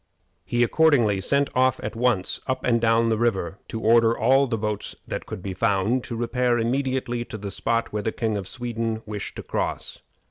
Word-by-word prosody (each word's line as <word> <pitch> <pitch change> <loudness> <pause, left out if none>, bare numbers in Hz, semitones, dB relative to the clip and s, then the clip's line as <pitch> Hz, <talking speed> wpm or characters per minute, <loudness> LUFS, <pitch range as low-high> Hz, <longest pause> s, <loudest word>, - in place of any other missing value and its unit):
He 120 0 +1
accordingly 120 -8 +3
sent 140 +6 +2
off 130 -1 +2
at 105 - -4
once 115 -5 +1
up 130 -1 -1
and 115 -2 +2
down 115 0 +3
the 110 -1 +1
river 100 -5 0
to 110 - -5
order 115 +1 +4
all 135 +4 +4
the 115 -2 -1
boats 105 -1 -3
that - - -5
could 90 - -7
be 95 - -4
found 110 +4 +1
to 125 -4 -5
repair 120 +1 +1
immediately 125 0 -1
to 115 - -7
the 100 -1 -6
spot 115 +4 -1
where 105 - -1
the 110 - -1
King 110 -2 -1
of 100 -2 -4
Sweden 115 -2 -3
wished 105 -1 -6
to - - -7
cross. - - -3
115 Hz, 200 wpm, -24 LUFS, 105-125 Hz, -, order